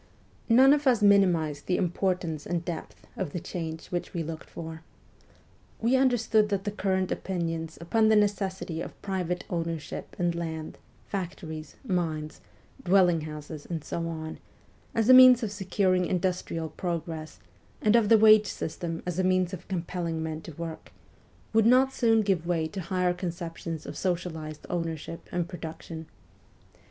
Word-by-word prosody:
None 260 +4 +7
of 290 -1 +1
us 240 -5 +4
minimized 175 -8 +3
the 180 - +2
importance 180 -3 -1
and 170 -1 -2
depth 170 -3 -6
of 180 -7 -4
the 175 - -2
change 165 -2 -5
which 175 0 -3
we 170 - -1
looked 160 0 -7
for. 160 -1 -7 1.0
We 235 +3 +2
understood 235 -5 +3
that 200 -2 -1
the 205 - -2
current 190 -2 0
opinions 165 -3 -3
upon 220 +7 +2
the 220 - +5
necessity 195 -5 0
of - - -8
private 180 -3 -2
ownership 165 -2 -4
in 175 -1 +1
land, 160 -2 -5 0.3
factories, 165 -5 -6
mines, 160 -6 -2 0.4
dwelling 180 -3 +4
houses, 150 0 -8
and 165 -4 -4
so 165 +2 -3
on, 160 -1 -5 0.6
as 225 -1 +2
a 255 - +9
means 255 -1 +9
of 215 - -2
securing 190 -2 +1
industrial 180 -3 -1
progress, 160 -1 -4 0.4
and 215 +1 +3
of 225 -3 +4
the 225 - +8
wage 215 -1 +7
system 165 -1 -4
as 180 0 -2
a - - +2
means 185 0 +2
of 180 -1 -7
compelling 170 -3 -3
men 160 0 -4
to 165 - -9
work, 165 +1 -7 0.6
would 220 0 +5
not 260 +2 +5
soon 225 -2 +3
give 185 -5 0
way 165 -3 +1
to 190 +4 -6
higher 180 +1 0
conceptions 170 -3 -5
of - - -7
socialized 160 -4 -3
ownership 165 -1 -4
and 175 -1 -1
production. 160 -2 -7
175 Hz, 155 wpm, -28 LUFS, 165-195 Hz, 1.0 s, a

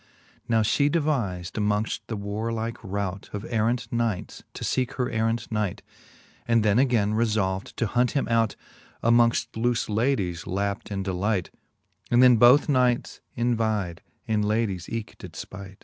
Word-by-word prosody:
Now 115 -1 +3
Ihe 140 +7 +2
deviz'd 120 - -1
amongft 105 +1 0
the 110 - -4
warlike 110 +3 -3
rout 100 -1 -4
Of 105 +1 -4
errant 115 +1 0
knights, 115 -5 -2
to - - -6
feeke 130 -2 0
her 125 -2 -2
errant 115 +1 -1
knight; 105 -4 -2 0.6
And 115 -2 +3
then 105 +2 +4
againe 115 -6 +2
refolv'd 105 -4 0
to - - +1
hunt 120 +3 +1
him 135 - 0
out 115 -2 +2 0.5
Amongil 115 0 +4
looie 120 +1 0
ladies, 105 - 0
lapped 100 +3 -2
in 100 -2 -3
delight: 95 0 -1 0.6
And 120 +1 +5
then 125 -2 +7
both 125 +6 +6
knights 125 -4 +1 0.2
envide, 110 -7 0 0.3
and 110 -1 +1
ladies 105 -5 -1
eke 115 -2 -5
did - - -10
ipight. 95 0 -9
110 Hz, 150 wpm, -26 LUFS, 100-120 Hz, 0.6 s, then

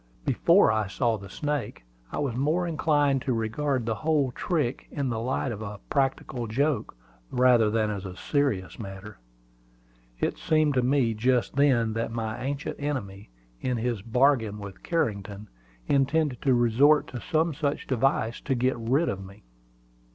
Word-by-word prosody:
Before - - +4
I 110 -2 0
saw 115 +3 0
the 100 -2 -9
snake, 145 - -3 0.3
I - - -4
was 140 -5 -1
more 155 +7 +1
inclined 145 -4 +2
to 130 - -1
regard 120 +3 -1
the 115 - 0
whole 145 +2 +1
trick 145 -2 -2
in 140 -3 -2
the 115 -2 -2
light 130 +2 -1
of 110 -1 -6
a 105 -1 -6
practical 135 -3 -1
joke, 135 - -1 0.3
rather 125 -3 +4
than 110 0 +1
as 100 -3 -4
a 90 -2 -7
serious 135 -12 -1
matter. 100 0 -8 1.0
It - - -1
seemed 155 -2 +2
to 130 - +2
me 125 -2 +2
just 120 +3 +1
then 125 -6 +3
that 115 +1 -2
my 115 0 -4
ancient 145 +3 -3
enemy, 110 -9 -4 0.3
in 125 -1 -1
his 115 -2 -2
bargain 115 -1 +2
with 100 -2 -9
Carrington, 105 - -2 0.4
intended 140 -1 +1
to 130 -3 +3
resort 125 +6 +4
to 120 -2 -6
some 160 -1 +1
such 145 -1 -2
device 125 -3 0
to 135 - -1
get 130 +2 +1
rid 135 +9 +1
of 95 0 -3
me. 100 +1 -13
125 Hz, 160 wpm, -27 LUFS, 110-145 Hz, 1.0 s, Before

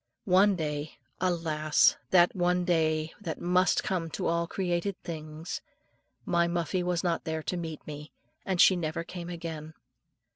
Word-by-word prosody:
One 195 +2 +5
day 150 -2 -4 0.2
alas! 165 -4 +3
that 180 0 +5
one 180 0 +1
day 155 -2 +1
that 165 -6 -4
must 180 +1 +2
come 170 -3 -1
to - - -3
all 170 0 +1
created 180 +1 -2
things 155 0 -6 0.6
my 170 -1 +2
Muffie 170 +1 -1
was 175 -1 -1
not 170 -2 0
there 160 -1 -3
to 180 - -2
meet 165 -3 -5
me, 150 0 -8 0.3
and 190 -2 -2
she 185 - +7
never 165 -1 -2
came 175 0 -7
again. 160 -2 -6
170 Hz, 150 wpm, -29 LUFS, 160-180 Hz, 0.6 s, she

